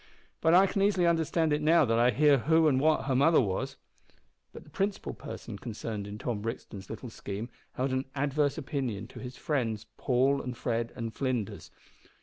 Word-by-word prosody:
But 160 Hz, +1 st, +5 dB
I 190 Hz, +2 st, +7 dB
can 195 Hz, 0 st, -1 dB
easily 195 Hz, -3 st, +3 dB
understand 165 Hz, -1 st, +2 dB
it 150 Hz, -, 0 dB
now 160 Hz, 0 st, +5 dB
that 115 Hz, -1 st, +2 dB
I 120 Hz, +1 st, +5 dB
hear 140 Hz, +3 st, +4 dB
who 160 Hz, +4 st, +4 dB
and 130 Hz, -3 st, +3 dB
what 155 Hz, 0 st, +2 dB
her 135 Hz, -2 st, +1 dB
mother 155 Hz, +5 st, +5 dB
was." 95 Hz, -6 st, -1 dB, 0.7 s
But -, -, -11 dB
the -, -, -19 dB
principal 195 Hz, 0 st, -2 dB
person 100 Hz, -, -8 dB
concerned 110 Hz, -3 st, -5 dB
in 105 Hz, 0 st, -7 dB
Tom 110 Hz, -1 st, -3 dB
Brixton's 105 Hz, -3 st, -6 dB
little 115 Hz, +2 st, -7 dB
scheme 105 Hz, +2 st, -6 dB, 0.2 s
held 130 Hz, +1 st, -1 dB
an 130 Hz, +1 st, 0 dB
adverse 145 Hz, 0 st, +1 dB
opinion 125 Hz, -7 st, -3 dB
to -, -, -10 dB
his 125 Hz, 0 st, -8 dB
friends 115 Hz, -7 st, -1 dB
Paul 135 Hz, +1 st, +2 dB
and 125 Hz, -1 st, -6 dB
Fred 115 Hz, -1 st, -1 dB
and 115 Hz, -2 st, -4 dB
Flinders. 125 Hz, -6 st, -3 dB
130 Hz, 185 wpm, -29 LUFS, 115-150 Hz, 0.7 s, I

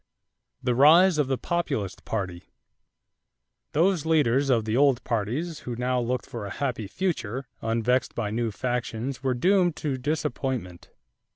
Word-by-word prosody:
=The 125 Hz, -, +2 dB
Rise 160 Hz, +6 st, +6 dB
of 145 Hz, -, +2 dB
the 135 Hz, -1 st, 0 dB
Populist 120 Hz, -, -2 dB
Party.= 95 Hz, -5 st, -4 dB, 1.3 s
Those 170 Hz, +1 st, +2 dB
leaders 145 Hz, -4 st, +2 dB
of 115 Hz, -4 st, +2 dB
the 110 Hz, 0 st, -1 dB
old 135 Hz, -2 st, +3 dB
parties 125 Hz, +9 st, -2 dB
who 120 Hz, -, -5 dB
now 125 Hz, +1 st, 0 dB
looked 125 Hz, +1 st, -2 dB
for 110 Hz, -4 st, -6 dB
a 100 Hz, -, -7 dB
happy 125 Hz, -7 st, -2 dB
future 135 Hz, -, -2 dB, 0.2 s
unvexed 115 Hz, +3 st, 0 dB
by 105 Hz, -3 st, -2 dB
new 115 Hz, +1 st, -1 dB
factions 120 Hz, +1 st, -3 dB
were 130 Hz, -2 st, 0 dB
doomed 180 Hz, +4 st, +3 dB
to 140 Hz, -5 st, -3 dB
disappointment. 130 Hz, -, -3 dB
125 Hz, 145 wpm, -26 LUFS, 115-150 Hz, 1.3 s, Rise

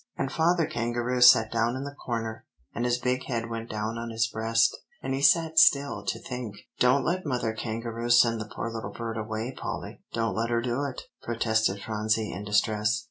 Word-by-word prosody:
and 135 Hz, -, -2 dB
Father 170 Hz, 0 st, +2 dB
Kangaroo 120 Hz, +1 st, -2 dB
sat 110 Hz, -2 st, +7 dB
down 115 Hz, +1 st, +1 dB
in 130 Hz, -, -4 dB
the 140 Hz, 0 st, -6 dB
corner, 115 Hz, -5 st, -4 dB, 0.3 s
and 120 Hz, -, -2 dB
his 120 Hz, 0 st, +2 dB
big 125 Hz, +1 st, -1 dB
head 115 Hz, -2 st, -3 dB
went 115 Hz, 0 st, -5 dB
down 110 Hz, +1 st, -3 dB
on 115 Hz, 0 st, -5 dB
his 115 Hz, 0 st, +1 dB
breast, 115 Hz, 0 st, +1 dB, 0.3 s
and 135 Hz, -, -2 dB
he 135 Hz, -, -2 dB
sat 160 Hz, +3 st, +4 dB
still 140 Hz, -3 st, +4 dB
to -, -, -1 dB
think." 125 Hz, -5 st, -6 dB, 0.2 s
"Don't 125 Hz, +3 st, +4 dB
let 185 Hz, +2 st, 0 dB
Mother 125 Hz, -6 st, -1 dB
Kangaroo 115 Hz, +1 st, -4 dB
send 115 Hz, -2 st, +5 dB
the 105 Hz, -, -7 dB
poor 115 Hz, -, -4 dB
little 115 Hz, -1 st, -5 dB
bird 115 Hz, -1 st, -5 dB
away, 110 Hz, +3 st, -4 dB
Polly. -, -, -6 dB
Don't 115 Hz, -1 st, -1 dB
let 115 Hz, +1 st, -1 dB
her 120 Hz, -1 st, +1 dB
do 125 Hz, +3 st, -1 dB
it!" 135 Hz, -3 st, -5 dB, 0.2 s
protested 110 Hz, -4 st, 0 dB
Phronsie 110 Hz, 0 st, -1 dB
in 95 Hz, -, -6 dB
distress. 105 Hz, +1 st, +1 dB
115 Hz, 195 wpm, -27 LUFS, 110-125 Hz, 0.3 s, sat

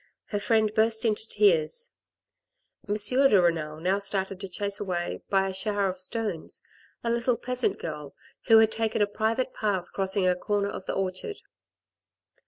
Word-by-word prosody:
Her 205 Hz, -, -3 dB
friend 215 Hz, 0 st, +2 dB
burst 220 Hz, +1 st, +2 dB
into 220 Hz, 0 st, 0 dB
tears. 205 Hz, -, +2 dB, 1.0 s
M. 205 Hz, -, +1 dB
de 250 Hz, +1 st, +4 dB
Renal 160 Hz, -3 st, 0 dB
now 185 Hz, +4 st, +1 dB
started 195 Hz, -1 st, -2 dB
to 195 Hz, -1 st, -6 dB
chase 200 Hz, +2 st, -2 dB
away 180 Hz, -4 st, -3 dB
by 195 Hz, -1 st, +2 dB
a 190 Hz, -, -4 dB
shower 200 Hz, +1 st, 0 dB
of 185 Hz, 0 st, -3 dB
stones 205 Hz, -3 st, -4 dB, 0.4 s
a 230 Hz, -, 0 dB
little 235 Hz, +1 st, +1 dB
peasant 250 Hz, +1 st, -1 dB
girl 150 Hz, -3 st, -7 dB, 0.3 s
who 225 Hz, -, +8 dB
had 220 Hz, 0 st, +5 dB
taken 220 Hz, -1 st, +1 dB
a -, -, +4 dB
private 225 Hz, +5 st, -1 dB
path 195 Hz, -5 st, -2 dB
crossing 190 Hz, -1 st, +1 dB
a 180 Hz, -, +3 dB
corner 200 Hz, +2 st, -1 dB
of 190 Hz, -, -8 dB
the -, -, -1 dB
orchard. 190 Hz, -, -3 dB
205 Hz, 165 wpm, -27 LUFS, 185-220 Hz, 1.0 s, who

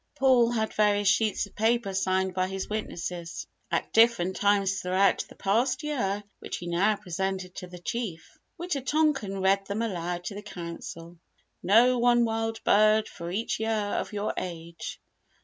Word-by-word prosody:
Paul 255 Hz, -3 st, +4 dB
had 220 Hz, -2 st, -1 dB
various 205 Hz, -1 st, +2 dB
sheets 215 Hz, +2 st, +2 dB
of 200 Hz, -, -18 dB
paper 220 Hz, -2 st, +1 dB
signed 190 Hz, 0 st, 0 dB
by 185 Hz, 0 st, 0 dB
his 190 Hz, 0 st, -4 dB
witnesses 175 Hz, -5 st, -5 dB, 0.2 s
at -, -, -2 dB
different 225 Hz, -5 st, +4 dB
times 200 Hz, -1 st, +2 dB
throughout 185 Hz, +1 st, +2 dB
the -, -, -14 dB
past 245 Hz, +8 st, +1 dB
year 210 Hz, -9 st, -1 dB, 0.2 s
which -, -, -5 dB
he 175 Hz, -, -8 dB
now 185 Hz, +5 st, +2 dB
presented 190 Hz, -1 st, -3 dB
to 180 Hz, -, -6 dB
the 180 Hz, 0 st, -10 dB
Chief. 185 Hz, -2 st, -4 dB, 0.3 s
Wita 345 Hz, -5 st, -2 dB
tonkan 270 Hz, -9 st, 0 dB
read 195 Hz, +1 st, +3 dB
them 205 Hz, +3 st, -2 dB
aloud 175 Hz, -4 st, -3 dB
to 200 Hz, -, -5 dB
the 205 Hz, -, -7 dB
Council. 170 Hz, -3 st, -8 dB, 0.4 s
"Know 235 Hz, +7 st, +5 dB
one 240 Hz, 0 st, +4 dB
wild 225 Hz, 0 st, -2 dB
bird 215 Hz, +1 st, +4 dB
for 170 Hz, -2 st, -7 dB
each 210 Hz, +6 st, -2 dB
year 220 Hz, 0 st, -1 dB, 0.3 s
of -, -, -5 dB
your 210 Hz, 0 st, -2 dB
age." 165 Hz, -2 st, -6 dB
200 Hz, 165 wpm, -27 LUFS, 185-225 Hz, 0.4 s, Know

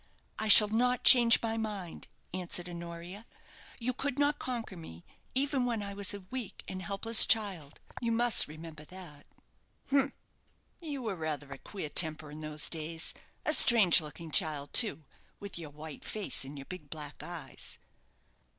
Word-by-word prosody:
"I 220 Hz, -, -2 dB
shall 210 Hz, 0 st, +9 dB
not 245 Hz, +3 st, 0 dB
change 240 Hz, -3 st, +8 dB
my 225 Hz, 0 st, -3 dB
mind," 205 Hz, -6 st, -7 dB, 0.3 s
answered 180 Hz, -1 st, -2 dB
Honoria. 170 Hz, +4 st, -10 dB, 0.5 s
"You 255 Hz, +1 st, -3 dB
could 275 Hz, +1 st, -4 dB
not 290 Hz, 0 st, 0 dB
conquer 235 Hz, -6 st, -6 dB
me, 85 Hz, -, -12 dB, 0.3 s
even 275 Hz, -1 st, -1 dB
when 235 Hz, -4 st, -3 dB
I 200 Hz, 0 st, -7 dB
was 200 Hz, -1 st, +1 dB
a 200 Hz, -1 st, -8 dB
weak 255 Hz, -5 st, -7 dB
and 185 Hz, 0 st, -7 dB
helpless 200 Hz, +5 st, +5 dB
child; 190 Hz, -10 st, 0 dB, 0.2 s
you 235 Hz, -1 st, -2 dB
must 235 Hz, 0 st, +3 dB
remember 155 Hz, 0 st, -11 dB
that." 170 Hz, -5 st, -13 dB, 0.6 s
"Humph! 275 Hz, -1 st, +1 dB, 0.7 s
you 290 Hz, -7 st, -7 dB
were 215 Hz, -4 st, -4 dB
rather 150 Hz, -4 st, -6 dB
a 135 Hz, -, -12 dB
queer 190 Hz, -7 st, -8 dB
temper 155 Hz, -2 st, +1 dB
in 150 Hz, +1 st, -10 dB
those 155 Hz, 0 st, 0 dB
days 165 Hz, 0 st, -4 dB, 0.3 s
a 310 Hz, -, +4 dB
strange 215 Hz, -, +7 dB
looking 155 Hz, +2 st, -10 dB
child, 145 Hz, -2 st, -1 dB
too, 205 Hz, -10 st, +4 dB, 0.3 s
with 200 Hz, -3 st, -8 dB
your 160 Hz, -3 st, -9 dB
white 150 Hz, 0 st, -11 dB
face 210 Hz, -8 st, -5 dB
and 140 Hz, +2 st, -9 dB
your 140 Hz, -, -10 dB
big 160 Hz, -4 st, -10 dB
black 150 Hz, -2 st, -9 dB
eyes." 175 Hz, -2 st, -7 dB
185 Hz, 160 wpm, -30 LUFS, 155-230 Hz, 0.7 s, shall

